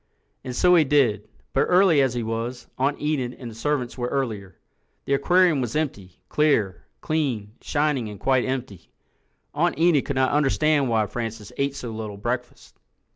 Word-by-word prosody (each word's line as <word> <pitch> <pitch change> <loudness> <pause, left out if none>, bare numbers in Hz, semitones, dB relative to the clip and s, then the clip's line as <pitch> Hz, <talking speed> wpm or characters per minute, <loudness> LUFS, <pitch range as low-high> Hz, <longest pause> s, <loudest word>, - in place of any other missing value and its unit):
And 125 -2 -6
so 180 +5 +4
he 170 -3 +6
did—but 135 -3 0
early 180 -5 +4
as 130 -2 +1
he 120 - -1
was, 115 +3 -4
Aunt 140 +2 +1
Enid 135 -5 -1
and 120 -3 -7
the - - -12
servants 130 0 -2
were 120 - -1
earlier. 110 -10 -3 0.5
The 140 - 0
aquarium 175 +1 +3
was 120 0 -3
empty—clear, 105 - -1 0.2
clean, 130 -10 -1
shining 145 -6 0
and 105 -2 -9
quite 130 -2 +2
empty. 125 -9 -5 0.6
Aunt 170 +4 +1
Enid 165 -4 +3
could 140 - -3
not 130 0 +2
understand 150 -1 +2
why 110 -2 +2
Francis 115 0 -6
ate 140 0 -1
so 120 -4 -6
little 110 -2 -6
breakfast. 120 +3 -5
130 Hz, 160 wpm, -24 LUFS, 115-150 Hz, 0.6 s, he